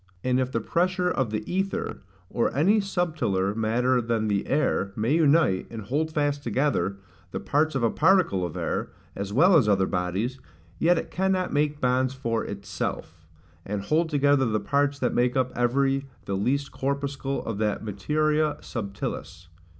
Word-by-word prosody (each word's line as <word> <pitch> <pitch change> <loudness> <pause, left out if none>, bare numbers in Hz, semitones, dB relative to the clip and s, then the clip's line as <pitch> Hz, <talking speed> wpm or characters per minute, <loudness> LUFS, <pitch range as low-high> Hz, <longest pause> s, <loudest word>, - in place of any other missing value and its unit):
And 130 0 +2
if 130 0 -1
the 115 - 0
pressure 180 - 0
of 130 -4 0
the 105 0 -3
aether, 195 +2 -2 0.3
or 115 - 0
any 200 +9 +4
subtiler 160 - 0
matter 120 +3 +1
than 115 -2 -1
the 100 -1 0
air, 135 -8 +1
may 115 +6 0
unite, 155 - +3
and 115 -2 -7
hold 150 +9 -1
fast 145 -2 0
together, 125 -5 0 0.3
the - - -4
parts 155 +1 +1
of 130 - 0
a 115 - +3
particle 180 - +3
of 85 -3 -4
air, - - -2 0.3
as 100 0 -4
well 175 - +5
as 130 -10 +4
other 95 -2 +3
bodies, 95 +8 -2 0.4
yet 175 +1 +4
it - - -4
cannot 190 0 0
make 145 0 +1
bonds 130 0 +1
for 115 -4 -1
ITSELF, 90 -5 -5 0.4
and 100 +1 -4
hold 160 +7 +1
together 145 -3 +3
the 110 -1 0
parts 140 +2 +1
that 125 - 0
make 125 +1 +1
up 130 -1 +1
every 135 +3 +1 0.2
the 100 - -2
least 140 +8 0
corpuscle 140 0 -3
of 100 - -4
that 105 -1 -1
MATERIA 150 +9 0
SUBTILIS. 100 -5 -6
130 Hz, 165 wpm, -26 LUFS, 105-150 Hz, 0.4 s, well